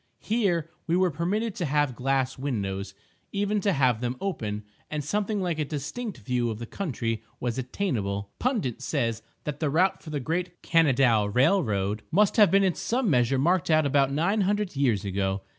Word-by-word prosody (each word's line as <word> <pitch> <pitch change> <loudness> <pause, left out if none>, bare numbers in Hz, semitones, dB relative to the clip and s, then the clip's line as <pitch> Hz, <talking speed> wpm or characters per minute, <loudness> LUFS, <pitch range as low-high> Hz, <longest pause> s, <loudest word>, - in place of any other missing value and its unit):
Here 180 -8 0 0.2
we 170 +1 +2
were 185 -1 +3
permitted 195 +8 -1
to 175 - -1
have 145 -3 +1
glass 135 +1 0
windows—even 115 - -3
to 200 - +2
have 130 - +2
them 125 +1 -2
open—and 110 - -5
something 205 +6 -1
like 170 -3 -1
a - - +2
distinct 165 - -5
view 120 +2 -1
of 110 - -3
the 120 - -6
country 115 - -3 0.2
was 120 0 -2
attainable.... 105 - -2
Pundit 220 - -1
says 115 -6 -1 0.2
that 150 -1 -4
the 155 - 0
route 180 +7 +2
for 160 - -10
the 150 -1 -2
great 175 +5 -3
Kanadaw 135 - +4
railroad 110 - +2
must 200 +7 +3
have 210 -3 +7
been 195 0 +4
in 185 -2 +3
some 235 0 0
measure 125 0 +3
marked 170 +6 +2
out 155 -1 +4
about 140 -1 +3
nine 175 +9 +1
hundred 205 -2 0
years 120 -7 +1
ago! 95 0 -1
145 Hz, 175 wpm, -27 LUFS, 120-185 Hz, 0.2 s, have